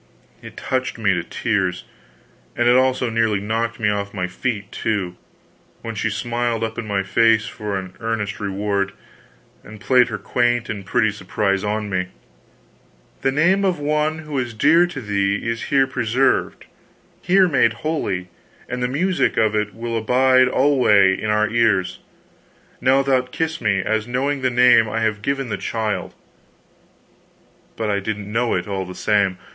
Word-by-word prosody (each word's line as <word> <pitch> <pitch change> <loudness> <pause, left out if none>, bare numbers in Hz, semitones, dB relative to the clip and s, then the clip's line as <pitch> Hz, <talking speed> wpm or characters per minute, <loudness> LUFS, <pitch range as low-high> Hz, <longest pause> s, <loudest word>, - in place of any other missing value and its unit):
It - - -12
touched 130 -2 -2
me 105 -4 +2
to 90 -2 -2
tears, 95 -2 -1 0.7
and 120 - +1
it 120 - +5
also 130 -2 +2
nearly 115 -3 +1
knocked 115 +3 -2
me 110 - +1
off 100 -1 -2
my 90 -2 -1
feet, 100 +2 -4
too, 100 -5 -2 0.7
when 115 - -5
she 110 +1 -1
smiled 120 +1 -2
up 115 +1 -3
in 115 - -6
my 100 -1 -1
face 110 +3 +3
for 105 -2 -4
an 95 -1 -7
earned 110 -2 -3
reward, 100 0 -2 0.7
and 105 +1 -12
played 125 +2 +4
her 110 - -4
quaint 120 +3 0
and 100 -3 -6
pretty 110 0 +2
surprise 100 0 -1
upon 105 +1 -2
me: 90 -1 -1 1.1
"The 135 - +1
name 175 +8 +2
of 185 -3 +1
one 150 +1 0
who 155 - -11
was 125 -4 -2
dear 170 +10 +4
to 160 -6 -7
thee 100 -2 0
is 115 -1 -2
here 135 -1 +3
preserved, 130 0 0 0.6
here 185 +1 +4
made 130 -8 +3
holy, 95 - -2 0.4
and 125 0 -4
the 125 - +1
music 175 +8 0
of 110 -1 +2
it 105 0 -1
will 115 0 -4
abide 130 +3 +3
alway 125 -8 +4
in 105 - -4
our 105 0 +2
ears. 105 -5 +1 0.8
Now 135 +1 +3
thou'lt 130 -2 0
kiss 160 +2 -2
me, 100 -4 +1
as 110 0 -1
knowing 135 +3 -1
the 130 - +2
name 120 -2 +5
I 115 +1 -2
have 110 -2 -1
given 135 +1 -2
the - - -2
child." 110 -2 -3 1.6
But 110 -2 -1
I 100 - 0
didn't 105 0 -5
know 115 +2 0
it, 90 +1 -2
all 95 -2 -3
the 90 - -8
same. 100 -3 +1
115 Hz, 165 wpm, -21 LUFS, 105-125 Hz, 1.6 s, it